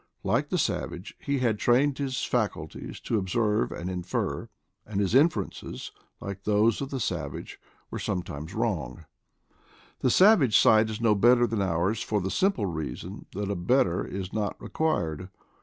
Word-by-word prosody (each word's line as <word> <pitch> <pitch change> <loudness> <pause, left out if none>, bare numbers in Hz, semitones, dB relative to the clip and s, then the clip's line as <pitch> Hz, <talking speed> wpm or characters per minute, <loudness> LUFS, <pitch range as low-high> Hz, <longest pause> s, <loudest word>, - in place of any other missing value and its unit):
Like - - +1
the - - 0
savage, 90 - -2
he 140 0 -1
had 115 -5 +1
trained 135 +4 +3
his 135 -2 -2
faculties 100 - -3
to 110 - 0
observe 105 +3 0
and 85 - -5
infer, 90 -1 -3 0.3
and 100 -2 -4
his 100 0 0
inferences, 135 - +1 0.3
like 100 -1 -6
those 105 +3 +2
of 135 - -3
the 135 - -3
savage, 80 - -4 0.3
were - - -4
some 95 -4 -2
times 75 +1 -7
wrong. 65 +7 -2 0.9
The 130 - +2
savage 170 - +6
sight 110 0 +5
is 110 +1 -5
no 115 -2 +4
better 120 +4 +5
than 115 -3 -1
ours 95 +4 0
for 105 - 0
the 95 0 -3
simple 185 - +1
reason 80 -5 -5
that 100 +1 -3
a - - -1
better 90 0 +2
is 95 -1 -6
not 105 -2 -2
required. 90 - -2
105 Hz, 160 wpm, -27 LUFS, 90-120 Hz, 0.9 s, savage